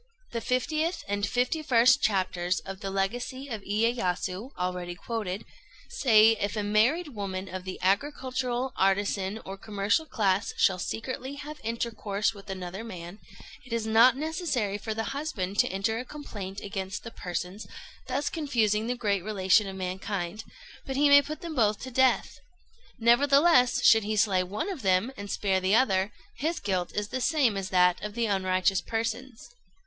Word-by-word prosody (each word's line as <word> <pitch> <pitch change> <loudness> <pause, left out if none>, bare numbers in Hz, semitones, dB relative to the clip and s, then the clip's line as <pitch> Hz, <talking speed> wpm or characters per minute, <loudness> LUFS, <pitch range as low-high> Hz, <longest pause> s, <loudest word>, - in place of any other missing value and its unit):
The 230 - -3
50th 310 - -1
and 205 0 -2
51st 250 +1 +3
chapters 185 -3 0
of 195 0 -8
the 195 - -4
"Legacy 245 +8 -3
of 220 -4 -4
Iyéyasu," 205 -1 -1
already 180 -1 -3
quoted, 205 -2 -4 0.4
say: 220 -3 +5
"If 205 +1 -2
a 210 - -1
married 235 +11 +2
woman 195 -5 -5
of 185 0 -6
the 185 - -5
agricultural, 255 +4 0
artisan, 195 +1 +1
or 195 +1 -6
commercial 205 +9 0
class 200 -4 0
shall 185 -1 +3
secretly 260 +7 -4
have 295 +2 -8
intercourse 225 -2 -1
with 200 -1 -13
another 190 +2 -5
man, 180 -3 -8 0.4
it 250 - -16
is 230 -1 -1
not 230 +4 +5
necessary 285 - -2
for 220 +1 -4
the 225 - -1
husband 215 -10 -3
to - - +5
enter 195 +4 -1
a - - -4
complaint 205 -9 -7
against 195 -1 -5
the 230 - -8
persons 180 +1 -5 0.4
thus 265 +3 -1
confusing 225 -8 0
the 250 - -1
great 200 -6 0
relation 200 0 +3
of 190 - -6
mankind, 190 +1 -4 0.4
but 270 - -5
he 290 +1 +4
may 285 0 +9
put 305 +2 -7
them 335 -2 -5
both 215 -6 +2
to 260 - -7
death. 260 +1 +2 0.6
Nevertheless, 275 +3 +4
should 225 -1 +7
he 215 +1 -1
slay 200 -3 +3
one 205 - -3
of 340 -8 -6
them 190 +5 +2
and 200 0 -8
spare 195 -2 +1
the 190 +3 +2
other, 195 -5 +2 0.3
his 325 +4 -1
guilt 185 -3 -1
is 210 0 -2
the 260 - -3
same 270 -7 +2
as 195 -1 -3
that 180 -1 +3
of 210 0 -6
the 235 -1 +1
unrighteous 185 -2 +1
persons. 230 +2 -4
215 Hz, 165 wpm, -28 LUFS, 195-255 Hz, 0.6 s, may